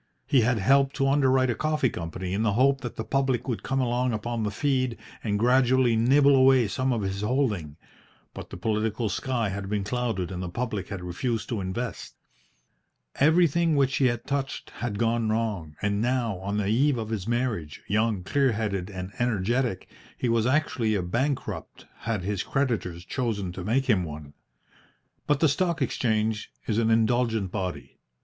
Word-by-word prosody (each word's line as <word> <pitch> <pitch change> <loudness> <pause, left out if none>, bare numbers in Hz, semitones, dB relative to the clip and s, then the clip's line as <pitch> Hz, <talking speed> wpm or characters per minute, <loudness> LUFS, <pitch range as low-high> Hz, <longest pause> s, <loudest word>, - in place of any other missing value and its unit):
He 130 - +4
had 120 +1 +2
helped 135 +6 +3
to 135 -1 +1
underwrite 130 -2 +3
a - - +1
coffee 155 -2 0
company 90 +2 -5
in 100 - 0
the 110 -2 +2
hope 135 +4 +3
that 120 - -6
the 110 - -4
public 135 -1 0
would 120 -4 -2
come 135 0 -1
along 125 0 +1
upon 115 +2 -3
the 105 - 0
feed 130 +2 0 0.3
and 105 -2 0
gradually 125 +1 +3
nibble 140 +5 +5
away 130 -3 +5
some 130 +6 -1
of 115 -4 -1
his 95 +1 -3
holding, 105 - -1 0.6
but - - -8
the - - -8
political 110 +3 -1
sky 120 -1 -1
had 100 0 -5
been 105 -1 -1
clouded 110 -5 -2
and 90 -1 -4
the 90 - -4
public 105 -2 -3
had 100 -3 -6
refused 110 +6 -3
to 115 -5 -2
invest. 105 +6 -5 1.0
Everything 165 +1 +4
which 135 -2 +2
he 135 - +4
had 120 -1 -2
touched 140 -1 -3
had 115 -4 -4
gone 115 0 +1
wrong, 105 -9 -2
and 105 0 +1
now, 120 -5 0
on 100 +2 -3
the 105 - 0
eve 130 +5 +3
of 110 -2 -4
his 105 -3 -3
marriage, 115 - -2
young, 105 -2 +1
clear 135 +5 +2
headed, 100 -4 -2
and 95 -1 -6
energetic, 120 -1 0 0.3
he - - -1
was 115 0 +2
actually 130 -6 +1
a 95 - 0
bankrupt 130 +10 -3
had 110 -5 -2
his 100 0 -1
creditors 110 -11 -2
chosen 105 -8 -2
to 90 0 -7
make 125 +7 +1
him 105 -8 +3
one. 75 -3 -8 0.9
But 145 -1 +2
the 160 - +6
Stock 170 +3 0
Exchange 110 -4 0
is 110 0 0
an 115 -1 +2
indulgent 115 -3 +2
body. 90 -8 -5
115 Hz, 180 wpm, -26 LUFS, 100-130 Hz, 1.0 s, the